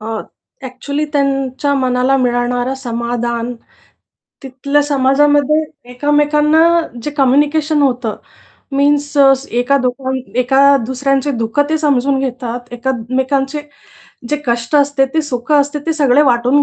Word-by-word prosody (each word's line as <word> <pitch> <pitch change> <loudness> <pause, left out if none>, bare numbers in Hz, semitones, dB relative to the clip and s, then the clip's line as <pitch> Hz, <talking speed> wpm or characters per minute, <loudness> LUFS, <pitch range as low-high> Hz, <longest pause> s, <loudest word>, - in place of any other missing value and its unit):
अ, 220 0 -4 0.4
actually 280 +4 -4
त्यांच्या 275 0 0
मनाला 255 0 +1
मिळणारं 245 0 -1
समाधान 235 -1 -3 0.9
तिथल्या 280 +2 -1
समाजामध्ये 290 +2 +2 0.3
एकमेकांना 295 +4 +2 0.4
जे 295 - -3
कम्युनिकेशन 295 +3 +2
होतं 250 -5 -1 0.6
मीन्स 290 +1 +1
अ, 270 -1 +7 0.2
एका 245 +4 +1
दोघां 260 +1 -2 0.3
एका 275 +3 +4
दुसऱ्यांचे 275 +2 -1
दुःखं 230 +5 0
ते 315 - +1
समजून 275 -3 +1
घेतात, 250 -2 -4
एकमेकांचे 265 +3 -2 0.7
जे 295 - +1
कष्ट 235 +4 0
असते, 285 -1 +2
ते 315 - +2
सुख 260 -1 -4
असते, 290 0 +2
ते 325 - +1
सगळे 290 -3 +3
वाटून 250 +4 +2
270 Hz, 115 wpm, -15 LUFS, 250-290 Hz, 0.9 s, अ